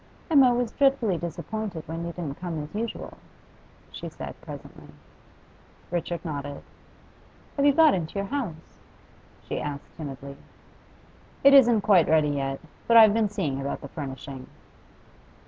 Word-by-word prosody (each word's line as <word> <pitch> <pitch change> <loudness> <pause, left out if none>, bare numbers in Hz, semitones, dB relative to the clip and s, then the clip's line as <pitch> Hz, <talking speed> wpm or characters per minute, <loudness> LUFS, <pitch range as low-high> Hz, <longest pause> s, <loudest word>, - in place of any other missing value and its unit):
'Emma 270 -5 +7
was 245 -1 0
dreadfully 270 -8 +2
disappointed 175 +2 -5
when 165 +1 -5
you 170 - -4
didn't 160 -5 -6
come 170 -3 -3
as 150 - -11
usual,' 225 +3 -5 0.7
she - - -7
said - - -8
presently. - - -10 1.0
Richard 175 0 -3
nodded. 145 -2 -5 0.9
'Have 280 0 +3
you - - +7
got 315 0 +6
into 170 -1 -3
your 200 0 -2
house?' 225 - -5 0.6
she - - -4
asked 145 -1 -6
timidly. 140 -2 -7 1.1
'It 275 0 +8
isn't 240 -5 +7
quite 190 -6 +4
ready 155 -1 +4
yet; 135 -1 -2 0.3
but 230 - +6
I've 220 -2 +9
been 220 -2 +2
seeing 155 -10 -2
about 140 - -4
the 140 - -8
furnishing. 135 -3 -7
175 Hz, 140 wpm, -26 LUFS, 145-225 Hz, 1.1 s, I've